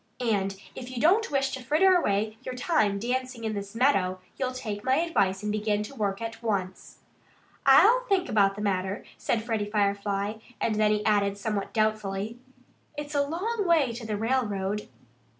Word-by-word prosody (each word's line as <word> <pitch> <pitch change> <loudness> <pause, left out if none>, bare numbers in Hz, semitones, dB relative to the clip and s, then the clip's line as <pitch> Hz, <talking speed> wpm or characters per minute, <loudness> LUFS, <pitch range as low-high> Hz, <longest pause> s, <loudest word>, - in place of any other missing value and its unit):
And 195 -5 0
if 250 -1 -8
you 255 -2 -5
don't 395 - +4
wish 275 -1 0
to 265 - -5
fritter 315 +9 +4
away 215 - +1
your 255 -1 -6
time 220 - +1
dancing 250 +2 -3
in 220 -1 -1
this 200 0 -6
meadow, 195 -8 +2 0.2
you'll 260 -1 -2
take 215 -5 -5
my 260 0 +3
advice 210 - +1
and 210 - -1
begin 210 0 0
to 210 - -9
work 205 -3 -2
at 225 0 -6
once." 195 -5 -3 0.7
"I'll - - +7
think 380 -2 +2
about 200 -2 +3
the 205 - -6
matter," 190 0 -1
said 225 -2 0
Freddie 220 -3 -2
Firefly. 200 0 0 0.2
And 225 - +1
then 215 0 +3
he 210 0 0
added 200 -2 +2
somewhat 205 -1 -3
doubtfully: 215 0 -1 0.6
"It's 295 0 -5
a 285 - +3
long 390 +9 -2
way 310 -7 +4
to 235 +1 -7
the 210 -1 -2
railroad." 210 -4 -1
220 Hz, 175 wpm, -27 LUFS, 200-260 Hz, 0.7 s, I'll